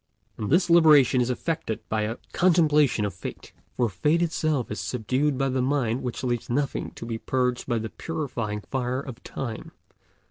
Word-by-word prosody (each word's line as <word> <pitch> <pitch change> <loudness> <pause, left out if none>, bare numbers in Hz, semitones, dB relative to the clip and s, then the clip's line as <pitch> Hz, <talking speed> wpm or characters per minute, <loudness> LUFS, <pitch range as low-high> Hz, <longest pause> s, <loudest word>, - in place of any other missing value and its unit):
And 105 - -4
this 175 +5 +4
liberation 150 -7 +6
is 120 - 0
effected 125 -3 -3
by 110 0 0
a 110 +3 -2 0.2
contemplation 150 - +3
of 100 - -3
Fate; 90 - -8 0.2
for 120 - +3
Fate 150 - +1
itself 155 -7 -1
is 105 - -3
subdued 130 +4 0
by 135 0 +1
the 130 -1 0
mind 130 -3 0
which 125 0 -4
leaves 120 -2 -2
nothing 140 +3 -1
to - - -7
be 115 -1 -4
purged 125 -1 -1
by 120 -2 +1
the 110 0 -3
purifying 120 -10 -4
fire 130 +2 -2
of 130 -4 -9
Time. 115 -5 -6
130 Hz, 175 wpm, -26 LUFS, 115-150 Hz, 0.2 s, liberation